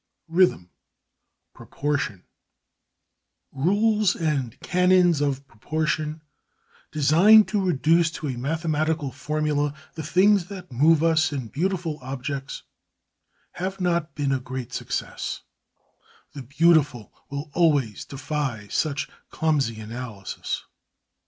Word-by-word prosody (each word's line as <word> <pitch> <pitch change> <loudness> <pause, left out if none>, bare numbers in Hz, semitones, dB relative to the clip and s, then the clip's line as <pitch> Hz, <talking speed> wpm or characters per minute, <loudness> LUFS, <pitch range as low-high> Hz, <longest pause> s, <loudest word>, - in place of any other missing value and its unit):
XVI - - -9
RHYTHM: 175 - +3 0.8
PROPORTION 140 -10 -3 1.3
Rules 205 +7 +2
and 140 -8 -2
canons 180 -3 +3
of 140 -1 -1
proportion 155 +5 -2 0.7
designed 170 +9 +6
to 205 -2 0
reduce 165 0 +3
to 165 - -7
a 130 - -2
mathematical 155 +2 -1
formula 150 +1 -1 0.2
the 160 - -6
things 185 +4 +3
that 185 -4 -9
move 155 +5 +4
us 160 -1 +3
in 130 -6 -4
beautiful 170 - -2
objects, 135 +1 -5 0.9
have 190 +2 -4
not 170 -4 0
been 140 -2 0
a 135 - +1
great 125 -1 -6
success; - - -4 0.9
the 140 - -7
beautiful 140 -3 +2 0.2
will 140 +1 -6
always 145 -11 +2
defy 135 -6 -4
such 150 -1 -1 0.2
clumsy 140 -8 0
analysis. 110 -3 -5
150 Hz, 105 wpm, -24 LUFS, 135-170 Hz, 1.3 s, designed